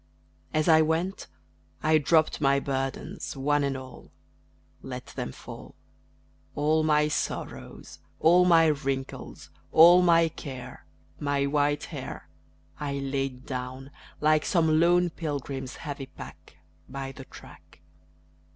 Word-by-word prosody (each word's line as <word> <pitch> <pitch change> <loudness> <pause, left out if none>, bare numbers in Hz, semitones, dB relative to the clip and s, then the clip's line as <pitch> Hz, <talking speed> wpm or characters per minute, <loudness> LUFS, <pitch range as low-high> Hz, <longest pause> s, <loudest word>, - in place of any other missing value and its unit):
As 155 +1 0
I 160 -1 +6
went, 165 +5 -1 0.6
I 155 0 +4
dropped 155 +2 +2
my 140 -1 +3
burdens, 135 0 -4
one 145 +2 +1
and 140 -1 -1
all 130 0 -11 0.7
Let - - -7
them - - -6
fall; - - -11 0.8
All 155 +2 +2
my 150 -1 +3
sorrows, 150 - -5 0.2
all 175 +3 +5
my 165 -2 +5
wrinkles, 135 - -3 0.2
all 175 +3 +8
my 170 -2 +5
care, 135 -5 -9 0.3
My 145 -1 0
white 145 +1 +1
hair, - - -7 0.5
I 145 -1 -3
laid 135 -2 -3
down, 130 +1 -6 0.3
like 155 0 +3
some 160 -4 +2
lone 175 +1 +3
pilgrim's 140 -4 -5
heavy 140 -3 -6
pack, 75 - -13 0.3
By 135 0 -5
the 135 0 -11
track. - - -16
145 Hz, 120 wpm, -27 LUFS, 135-160 Hz, 0.8 s, all